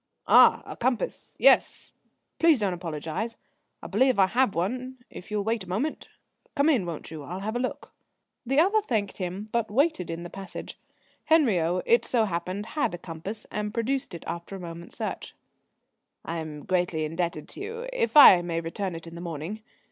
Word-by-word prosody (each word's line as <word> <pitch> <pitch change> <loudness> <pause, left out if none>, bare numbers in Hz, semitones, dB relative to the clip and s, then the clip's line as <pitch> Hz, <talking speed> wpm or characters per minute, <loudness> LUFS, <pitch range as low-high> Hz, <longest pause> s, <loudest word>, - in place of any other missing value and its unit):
"Ah, - - +7
a - - -8
compass, - - -2
yes! - - +4 0.5
Please 325 -5 +5
don't 200 -3 0
apologise. 175 +6 -4 0.5
I - - -5
believe 260 -4 +3
I 195 - +6
have 235 +3 +1
one 255 +9 -2
if 180 - -10
you'll 210 -1 -1
wait 220 -2 -1
a - - -13
moment. 235 +12 -2 0.5
Come 285 +1 +3
in, 235 - +2
won't 165 -2 -6
you? 160 -2 -7
I'll 180 +6 -6
have 215 +3 -3
a - - 0
look." 255 - -4 0.5
The 270 +3 +1
other 400 +6 +4
thanked 220 - -2
him 190 +3 -5
but 235 -2 0
waited 250 - +1
in 165 +1 -4
the 175 - -7
passage. 195 -1 -8 0.5
Henriot, 185 - +3
it 235 - +4
so 230 -3 +2
happened, 185 +2 -3
had 295 - 0
a - - -7
compass, 175 +6 -7
and 210 +1 -3
produced 255 -2 -1
it 165 - -9
after 170 +3 -6
a - - -7
moment's 170 -1 -7
search. - - -5 0.9
"I 170 - -3
am 155 -2 -6
greatly 175 -4 0
indebted 165 -1 -3
to - - -7
you 460 +4 -5
if 470 -10 +1
I 190 -11 +10
may 170 -1 -2
return 170 +2 -4
it 165 - -8
in 165 - -10
the 170 - -8
morning. 170 +5 -5
195 Hz, 185 wpm, -27 LUFS, 170-250 Hz, 0.9 s, I